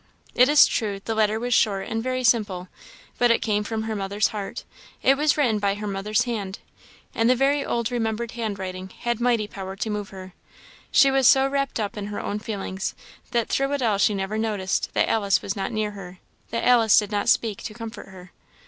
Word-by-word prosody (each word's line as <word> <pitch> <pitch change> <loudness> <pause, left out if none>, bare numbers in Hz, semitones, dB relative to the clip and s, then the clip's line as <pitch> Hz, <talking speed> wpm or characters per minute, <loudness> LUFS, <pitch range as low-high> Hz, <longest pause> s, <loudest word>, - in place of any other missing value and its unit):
It 250 +2 +5
is 295 0 +8
true, 205 -4 -2
the 225 - -1
letter 215 0 +1
was 245 +1 -1
short 200 -4 +2
and 225 0 -2
very 255 +1 -2
simple; 205 -7 +1 0.5
but 245 - +4
it 230 - +2
came 210 -2 0
from 220 +1 -3
her 220 0 -3
mother's 200 +1 0
heart; 205 -2 -6 0.4
it 270 - +5
was 300 +2 +2
written 240 -8 +2
by 200 -1 0
her 210 +1 -6
mother's 200 +1 0
hand; 210 -5 -4 0.6
and 225 +1 +2
the 255 - +5
very 275 +2 +2
old 235 -2 -2
remembered 230 -1 -2
hand 220 -4 -4
writing 185 -1 -6
had 240 -1 -1
mighty 235 -3 +2
power 190 -2 -7
to 215 +3 -3
move 210 -1 -4
her. 185 -1 -10 0.6
She 275 - +6
was 270 -2 +4
so 270 0 +6
wrapped 275 -2 -1
up 205 -1 -3
in 205 -1 -4
her 205 - -5
own 205 - -3
feelings, 195 -3 -4 0.3
that 235 -2 0
through 275 +1 0
it 280 -2 -1
all 210 -4 +1
she 205 +1 +3
never 195 +3 -2
noticed 205 -4 -1
that - - +3
Alice 200 -4 +1
was 195 - -3
not 195 +1 -3
near 215 -2 -1
her, 190 -3 -10 0.3
that 230 - -2
Alice 230 -4 +5
did 210 -1 +2
not 205 -1 0
speak 220 -4 +1
to 215 - -7
comfort 230 -2 -8
her. 185 -1 -13
215 Hz, 215 wpm, -24 LUFS, 200-235 Hz, 0.6 s, is